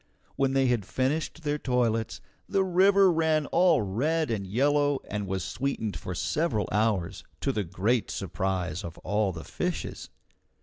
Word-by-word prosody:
When 135 -1 +1
they 135 0 +3
had 120 -4 +1
finished 150 - -2
their 150 0 -1
toilets, 120 -4 0 0.3
the 195 -1 +2
river 190 +1 +5
ran 160 -2 +2
all 170 -7 +3
red 140 +9 0
and 100 -4 -2
yellow 145 +6 +2
and 105 -1 -3
was 95 -1 -2
sweetened 115 -1 -2
for 90 - -5
several 120 - 0
hours, 105 -3 0 0.2
to 135 - +1
the 105 -5 -1
great 100 +7 0
surprise 90 -3 -2
of 85 -1 -7
all 105 -1 +1
the 80 -2 -8
fishes. - - -4
125 Hz, 155 wpm, -28 LUFS, 100-150 Hz, 0.3 s, river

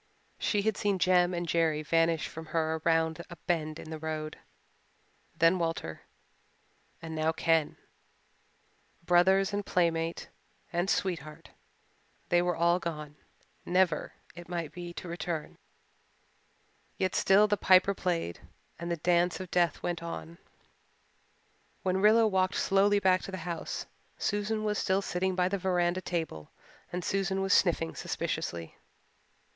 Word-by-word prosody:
She 205 -2 +1
had 220 -1 0
seen 200 -2 +1
Jem 180 0 +4
and 175 -1 -3
Jerry 160 -2 +1
vanish 165 0 +2
from 160 0 -9
her 160 0 0
around 165 0 +1
a 175 - -8
bend 155 -3 -1
in 155 - -9
the 160 - -5
road 155 -1 -4 1.0
then 165 +3 +4
Walter 165 - -3 1.0
and 160 -1 -6
now 155 0 +1
Ken. 165 -1 +1 1.3
Brothers 190 +3 +4
and 205 0 -1
playmate 165 -3 0 0.5
and 175 +2 0
sweetheart 155 -7 -2 0.8
they 175 0 +4
were 175 -1 0
all 170 +2 +3
gone, 150 -4 -5 0.5
never, 180 -3 +1 0.2
it 175 0 -11
might 170 -4 -3
be, 175 +1 -7
to 180 - -7
return. 170 -2 -4 1.4
Yet 185 -1 0
still 200 +2 +5
the 205 - +2
Piper 190 0 +5
piped 170 - -2 0.4
and 170 +1 -4
the 170 - -1
dance 175 +2 +2
of 185 -2 -7
death 175 -2 +1
went 175 -1 -2
on. 170 0 -7 1.4
When 190 0 +1
Rilla 220 +2 +6
walked 190 -2 +1
slowly 200 +1 +3
back 185 -2 +3
to - - -7
the 190 - -4
house 170 -2 -4 0.3
Susan 210 +1 -1
was 210 -1 0
still 190 +1 +1
sitting 185 +1 -1
by 180 -1 +2
the 200 +1 -2
veranda 180 -1 +1
table 160 - -4 0.4
and 180 0 -4
Susan 195 -1 0
was 195 - +2
sniffing 165 -3 +2
suspiciously. 85 -1 -4
175 Hz, 140 wpm, -30 LUFS, 165-190 Hz, 1.4 s, Rilla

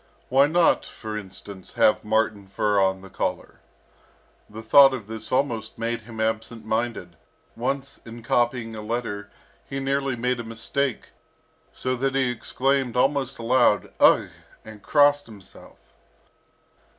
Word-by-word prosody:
Why 135 +2 +5
not, 170 +2 +3
for 110 -1 -8
instance, 100 -1 -9
have 105 - +3
marten 105 -2 0
fur 100 +1 0
on 95 0 +1
the 95 - -12
collar? - - -4 0.9
The 110 +2 -9
thought 135 +3 +7
of 115 -5 -8
this 110 +1 -7
almost 120 -5 -1
made 115 +1 -2
him 110 0 -11
absent 110 0 -2
minded. 110 -6 -3 0.4
Once, 135 +3 -3
in 115 0 -11
copying 120 -1 0
a 110 - -6
letter, 105 -2 -4 0.3
he 135 - -5
nearly 135 -1 -1
made 125 +1 -1
a - - -4
mistake, 115 +4 -2 0.6
so 130 0 -2
that 135 +1 -1
he 130 -2 +2
exclaimed 130 +1 -1
almost 135 0 +1
aloud, 120 -2 +2
"Ugh!" - - +5 0.4
and 110 -1 -11
crossed 145 +4 +3
himself. 100 -3 -15
115 Hz, 140 wpm, -24 LUFS, 110-135 Hz, 0.9 s, thought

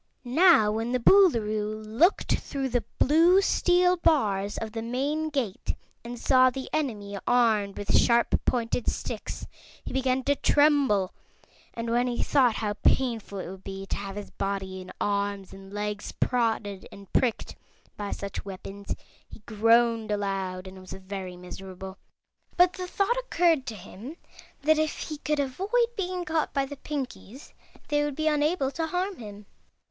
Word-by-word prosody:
Now 265 - +5
when 225 +3 -2
the 255 - +2
Boolooroo 215 - +3
looked 265 - +2
through 270 -2 -3
the 245 -1 0
blue 330 +6 +5
steel 360 -2 +3
bars 210 - +1
of 220 -1 -4
the 225 0 -4
main 280 +7 -1
gate 260 -10 -2 0.3
and 240 +1 -7
saw 255 +1 +5
the 260 +1 -6
enemy 210 -10 -2
armed 220 -5 +2
with 205 - 0
sharp 235 0 +3
pointed 235 0 -1
sticks, - - -5 0.4
he - - -6
began 260 0 +1
to 285 +2 +2
tremble; 280 -12 +3 0.6
and 230 0 -3
when 245 +1 +2
he 240 -1 -1
thought 255 -6 +3
how 210 -2 -1
painful 230 -6 +1
it 185 - -5
would 190 +1 -9
be 195 0 -6
to - - -3
have 195 -1 -6
his 205 -1 -7
body 190 -1 -3
and 185 - -10
arms 200 -1 -1
and 195 0 -12
legs 210 0 -4
prodded 225 -5 -1
and 195 -2 -14
pricked 245 -4 0 0.4
by 205 -1 -5
such 200 -1 -5
weapons 195 +1 -7 0.3
he 220 - -13
groaned 230 0 +3
aloud 195 -3 -2
and 190 0 -10
was 185 0 -10
very 190 -1 -7
miserable. 190 +1 -9 0.6
But 360 +1 +5
the 365 -1 -5
thought 400 +6 0
occurred 335 - +2
to 225 - -4
him 225 - -10 0.5
that 310 +1 +4
if 310 0 0
he 305 -2 -6
could 300 0 -1
avoid 280 +9 -3 0.3
being 365 -3 -3
caught 315 -2 -1
by 275 -1 +2
the 285 +1 -8
Pinkies 270 -3 -7 0.4
they 295 0 +2
would 295 -2 -2
be 310 - -2
unable 300 -1 +1
to 325 +2 -2
harm 365 +2 -2
him. 205 -2 -10
235 Hz, 160 wpm, -27 LUFS, 200-295 Hz, 0.6 s, Now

